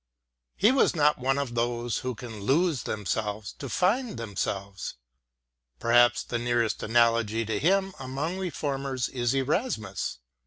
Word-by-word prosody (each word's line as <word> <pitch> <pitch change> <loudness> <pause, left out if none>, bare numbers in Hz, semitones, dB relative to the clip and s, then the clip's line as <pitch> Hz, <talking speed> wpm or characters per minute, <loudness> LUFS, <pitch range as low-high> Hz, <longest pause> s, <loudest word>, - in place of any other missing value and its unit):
He 210 +5 +5
was 265 -8 +3
not 150 -2 +3
one 135 +2 +1
of 140 -4 -2
those 120 -1 -1
who 125 -1 -3
can 115 -2 -8
lose 145 - +2
themselves 105 0 -3
to 140 - -5
find 215 - +1
themselves. 100 -3 -4 0.8
Perhaps 120 +1 +4
the 120 - -3
nearest 120 -2 0
analogy 115 -1 +2
to 105 -1 -1
him 190 +3 +2
among 140 +8 -3
Reformers 140 -7 -2
is 120 -1 0
Erasmus. 135 - -1
120 Hz, 130 wpm, -27 LUFS, 115-150 Hz, 0.8 s, He